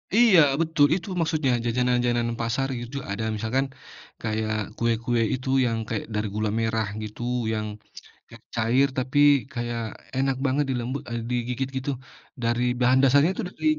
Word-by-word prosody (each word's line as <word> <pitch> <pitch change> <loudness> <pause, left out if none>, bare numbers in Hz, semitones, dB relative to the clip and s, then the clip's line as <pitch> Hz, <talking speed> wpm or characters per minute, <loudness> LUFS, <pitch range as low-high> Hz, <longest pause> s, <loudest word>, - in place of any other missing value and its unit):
Iya 220 -6 +7 0.2
betul 160 -3 +3
itu 185 +2 -5
maksudnya 155 -5 +1
jajanan 125 +1 +2
jajanan 120 -1 0
pasar 125 +4 0
gitu 120 +4 -6
ada 100 +3 -3
misalkan 115 +6 0 0.6
kayak, 110 -1 -1 0.2
kue-kue 115 0 +1
itu 130 +1 -3 0.2
yang 115 -2 0
kayak 115 - -2
dari 105 0 0
gula 110 0 0
merah 110 -1 0 0.2
gitu 105 +2 -8 0.3
yang, 110 0 -2 0.6
kayak 115 0 -14
cair 120 +4 +3
tapi 130 +2 0 0.3
kayak 120 -2 -3 0.4
enak 135 0 +1
banget 140 +2 +1
dilembut, 130 +2 -2
eee, 120 - -2
digigit 125 +2 -1
gitu 130 +2 -2 0.5
dari 120 +1 +1 0.2
bahan 125 +1 +4
dasarnya 140 +5 +5
itu - - -3
dari - - -11
120 Hz, 150 wpm, -25 LUFS, 115-135 Hz, 0.6 s, Iya